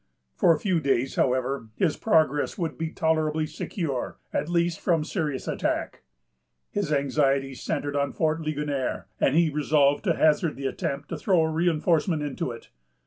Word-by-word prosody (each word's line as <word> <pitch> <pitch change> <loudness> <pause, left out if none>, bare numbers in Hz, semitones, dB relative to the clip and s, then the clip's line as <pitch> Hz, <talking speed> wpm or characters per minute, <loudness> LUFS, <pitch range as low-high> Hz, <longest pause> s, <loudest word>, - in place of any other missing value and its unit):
For 165 - +4
a 160 - +2
few 185 -1 +1
days, 135 -3 0
however, 130 -1 0
his 170 -6 +1
progress 155 -8 +2
would 170 -4 -2
be 165 0 -3
tolerably 155 -1 0
secure, 155 -3 -4 0.2
at 150 +3 -1
least 170 -1 +1
from 165 -3 +1
serious 150 -5 -3
attack. - - -2 0.7
His 205 -6 -2
anxieties 135 -1 +1
centred 145 0 -2
on 140 0 0
Fort 160 0 0
Ligonier, 150 -4 -2
and 135 - +2
he 165 -1 +4
resolved 145 -1 +2
to 170 -4 +2
hazard 155 0 +3
the 135 - -6
attempt 140 +1 -3
to - - -3
throw 185 -5 +2
a 160 0 +1
reinforcement 165 -1 +1
into 145 -2 -3
it. 115 -1 -9
155 Hz, 160 wpm, -26 LUFS, 140-165 Hz, 0.7 s, For